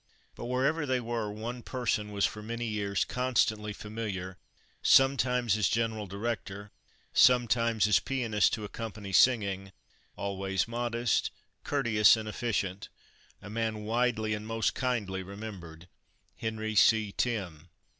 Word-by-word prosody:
But, - - -8
wherever 140 +5 0
they 130 -1 +1
were, 115 -3 -3
one 115 +4 -6
person 115 -5 -2
was 100 -1 +1
for 105 - -3
many 115 +2 -4
years 100 -3 -1
constantly 110 -4 0
familiar, 105 -3 -5 0.4
sometimes 125 -4 +4
as 105 -3 +2
general 110 -2 -1
director, 100 0 -5 0.4
sometimes 115 -3 +4
as 105 - +4
pianist 115 -6 +1
to 110 - -2
accompany 105 -1 -6
singing, 100 -4 +3 0.4
always 95 0 -2
modest, 120 0 0 0.3
courteous, 115 -7 +4
and 110 -1 -5
efficient, 105 -4 -2 0.5
a 105 - -8
man 110 -1 -2
widely 110 -1 0
and 105 0 -5
most 115 0 0
kindly 110 -7 -2
remembered 95 -4 -9 0.5
Henry 110 -1 -3
C. 110 0 +4
Timm. 95 -9 -3
110 Hz, 125 wpm, -30 LUFS, 100-120 Hz, 0.5 s, sometimes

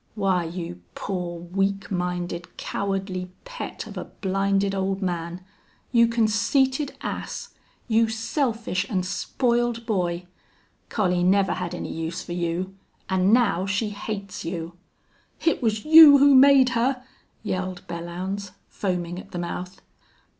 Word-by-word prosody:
Why, 190 -4 +1
you 165 - -6
poor, 180 -3 -4
weak 195 +3 -1
minded, 180 -1 -3
cowardly 195 -2 -3 0.2
pet - - -6
of - - -9
a - - -5
blinded 195 0 0
old 195 0 -1
man 175 0 -3 0.5
you 235 -1 +5
conceited 260 +5 +1
ass - - -5 0.4
you 225 -1 +3
selfish 225 - -1
an' 185 -3 0
spoiled 235 +5 0
boy!... 180 -5 -1 0.6
Collie 180 -5 +1
never 195 +1 +3
had 180 -1 -4
any - - -5
use 165 +2 -4
for 175 - -6
you. 175 +2 -2 0.4
An' 190 +1 +3
now 215 -6 +3
she 205 +2 0
hates 200 -1 -6
you." 165 0 -4 0.7
"It 330 - +2
was 220 -3 0
you 310 -2 +10
who 280 0 +6
made 270 -1 +7
her!" 250 +2 0 0.4
yelled 185 -3 -3
Belllounds, 180 +3 -5 0.2
foaming 180 -2 -3
at - - -12
the - - -6
mouth. 180 +2 -5
195 Hz, 130 wpm, -24 LUFS, 180-225 Hz, 0.7 s, you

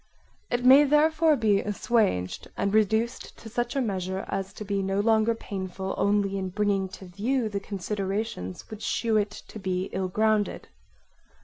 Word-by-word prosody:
It 245 0 -1
may 270 +3 +9
therefore 305 +2 +4
be 215 -5 +2
assuaged 205 - 0
and 200 0 0
reduced 220 +3 +1
to 225 - -10
such 240 +3 -2
a 275 - +2
measure 190 -4 -2
as 195 0 -3
to 210 - -8
be 200 -1 -1
no 195 +1 -1
longer 220 +1 +3
painful 190 -3 -5
only 200 -1 +1
in 190 -1 -3
bringing 200 -1 0
to 190 - -11
view 220 +7 -1
the 200 -1 -2
considerations 195 - -4
which 215 0 -8
shew 225 0 0
it 210 -1 +1
to 210 +1 -11
be 185 -1 -2
ill 190 0 -1
grounded. 215 +2 0
205 Hz, 165 wpm, -27 LUFS, 195-225 Hz, -, may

